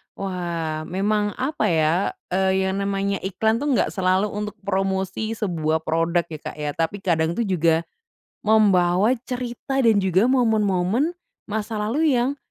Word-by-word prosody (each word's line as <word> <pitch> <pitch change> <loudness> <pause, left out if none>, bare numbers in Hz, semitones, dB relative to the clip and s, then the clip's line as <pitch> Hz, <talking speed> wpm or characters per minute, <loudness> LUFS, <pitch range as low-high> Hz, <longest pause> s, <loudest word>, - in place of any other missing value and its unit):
Wah, 170 -5 -3
memang 205 +3 0
apa 275 +4 -1
ya, 165 +2 +1 0.2
eee, 190 0 +2
yang 195 +1 -2
namanya 200 0 -1
iklan 220 +5 0
tuh 290 - -2
nggak - - +1
selalu 190 +1 +1
untuk 210 0 -4
promosi 195 +3 -1
sebuah 160 -6 -1
product, 165 +1 0
ya, 155 - -6
Kak, - - -7
ya. 150 -1 -3
Tapi 165 +6 -2
kadang 165 -2 +1
tuh 235 - 0
juga 165 -4 +2 0.6
membawa 205 +1 +4
cerita 250 +2 -3
dan 225 -4 +4
juga 190 +4 +3
momen-momen 220 - +2 0.3
masa 215 0 -3
lalu 280 +7 +1
yang 255 +4 +1
195 Hz, 145 wpm, -23 LUFS, 175-220 Hz, 0.6 s, membawa